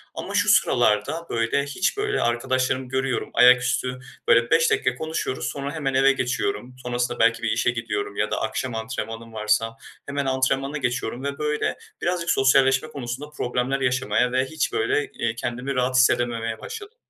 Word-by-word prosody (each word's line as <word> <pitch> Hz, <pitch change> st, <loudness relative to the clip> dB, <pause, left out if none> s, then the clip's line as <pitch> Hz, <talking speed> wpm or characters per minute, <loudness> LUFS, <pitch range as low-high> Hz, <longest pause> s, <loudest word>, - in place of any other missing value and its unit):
Ama -, -, -6 dB
şu -, -, +3 dB
sıralarda, 105 Hz, +11 st, +2 dB
böyle, 115 Hz, +4 st, 0 dB
hiç, 180 Hz, -, -1 dB
böyle, 415 Hz, 0 st, 0 dB
arkadaşlarımı 130 Hz, +2 st, 0 dB
görüyorum, 130 Hz, 0 st, -1 dB
ayaküstü, 125 Hz, +1 st, +4 dB, 0.3 s
böyle, 115 Hz, 0 st, +4 dB
5 165 Hz, 0 st, +4 dB
dakika -, -, +1 dB
konuşuyoruz, 160 Hz, -5 st, -3 dB
sonra 140 Hz, +1 st, -4 dB
hemen 140 Hz, -4 st, -2 dB
eve 135 Hz, +1 st, +5 dB
geçiyorum. 130 Hz, 0 st, -2 dB
Sonrasında 120 Hz, 0 st, -2 dB
belki 115 Hz, 0 st, +3 dB
bir 115 Hz, -, +1 dB
işe 115 Hz, +1 st, +2 dB
gidiyorum 105 Hz, -3 st, -3 dB
ya 105 Hz, -, -1 dB
da -, -, -1 dB
akşam 115 Hz, +2 st, -3 dB
antrenmanım 115 Hz, 0 st, -5 dB
varsa 110 Hz, +1 st, 0 dB, 0.3 s
hemen 140 Hz, 0 st, -2 dB
antrenmana 135 Hz, +2 st, 0 dB
geçiyorum 120 Hz, -1 st, -2 dB
ve, 140 Hz, 0 st, -3 dB
böyle, 150 Hz, 0 st, -1 dB, 0.2 s
birazcık 175 Hz, -1 st, -1 dB
sosyalleşme 135 Hz, +2 st, +4 dB
konusunda 140 Hz, 0 st, -6 dB
problemler 130 Hz, -1 st, -2 dB
yaşamaya 125 Hz, -1 st, +1 dB
ve 130 Hz, +1 st, +1 dB
hiç, 160 Hz, -, -2 dB
böyle, 425 Hz, 0 st, 0 dB
iii, 115 Hz, -1 st, -2 dB
kendimi 125 Hz, +3 st, -3 dB
rahat 130 Hz, 0 st, 0 dB
hissedememeye 115 Hz, -3 st, +2 dB
başladım. 445 Hz, +2 st, -8 dB
130 Hz, 160 wpm, -24 LUFS, 120-140 Hz, 0.3 s, eve